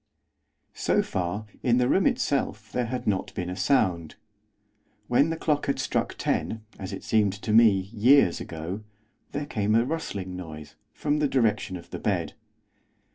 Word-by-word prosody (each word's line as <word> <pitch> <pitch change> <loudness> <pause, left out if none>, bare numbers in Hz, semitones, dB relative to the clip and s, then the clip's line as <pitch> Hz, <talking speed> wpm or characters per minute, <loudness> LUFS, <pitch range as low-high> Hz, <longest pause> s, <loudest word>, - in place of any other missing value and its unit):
So - - +1
far, 95 +4 -3 0.2
in 120 -1 +3
the 125 -1 +3
room 190 +7 +3
itself 110 -6 -1
there 125 -2 -1
had 125 +2 -4
not 100 -3 0
been 90 0 -3
a - - -4
sound. 90 - +1 0.9
When 140 +6 +3
the 165 - -2
clock 150 -2 0
had 140 - +1
struck - - -1
ten, 110 -1 -1
as 95 - -5
it - - -6
seemed 105 -3 +2
to 105 +2 -3
me, 115 0 +8 0.2
years 120 -3 +5
ago, 85 +6 -6 0.5
there 145 0 -3
came 105 -5 0
a 115 +1 +4
rustling 100 - -4
noise, 80 -4 -8 0.2
from 150 0 -1
the 150 - +2
direction 115 -8 +1
of 85 - -14
the - - -5
bed. - - -1
110 Hz, 165 wpm, -26 LUFS, 95-135 Hz, 0.9 s, me